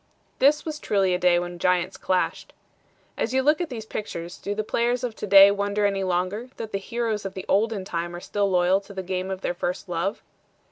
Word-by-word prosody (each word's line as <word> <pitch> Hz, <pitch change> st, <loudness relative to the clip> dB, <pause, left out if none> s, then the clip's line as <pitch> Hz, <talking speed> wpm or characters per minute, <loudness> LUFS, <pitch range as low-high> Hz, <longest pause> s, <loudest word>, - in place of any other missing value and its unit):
This 295 Hz, +3 st, +4 dB
was 310 Hz, -2 st, -4 dB
truly 195 Hz, -7 st, +1 dB
a 180 Hz, -, 0 dB
day 180 Hz, -1 st, +4 dB
when 175 Hz, 0 st, -4 dB
giants 180 Hz, 0 st, +1 dB
clashed. 185 Hz, -1 st, -1 dB, 0.7 s
As 240 Hz, +3 st, -1 dB
you 265 Hz, -, +3 dB
look 300 Hz, +4 st, +3 dB
at 345 Hz, -, -2 dB
these 225 Hz, -4 st, -6 dB
pictures 175 Hz, -5 st, -6 dB
do 205 Hz, -, -3 dB
the 215 Hz, -, -1 dB
players 240 Hz, +3 st, 0 dB
of 240 Hz, -3 st, -3 dB
to 210 Hz, -, -5 dB
day 195 Hz, 0 st, +9 dB
wonder 200 Hz, +1 st, 0 dB
any 195 Hz, -1 st, +1 dB
longer 185 Hz, +6 st, -1 dB
that 220 Hz, -1 st, -6 dB
the 195 Hz, -, -1 dB
heroes 225 Hz, 0 st, -2 dB
of 195 Hz, -, -6 dB
the 190 Hz, -, -6 dB
olden 210 Hz, -1 st, +1 dB
time 175 Hz, -1 st, -3 dB
are -, -, -6 dB
still 200 Hz, +2 st, -1 dB
loyal 185 Hz, +1 st, +3 dB
to 200 Hz, 0 st, -13 dB
the 190 Hz, -, -4 dB
game 185 Hz, +1 st, -3 dB
of 190 Hz, -1 st, -4 dB
their -, -, -1 dB
first 180 Hz, +1 st, -3 dB
love? 175 Hz, +4 st, -2 dB
195 Hz, 225 wpm, -25 LUFS, 180-220 Hz, 0.7 s, day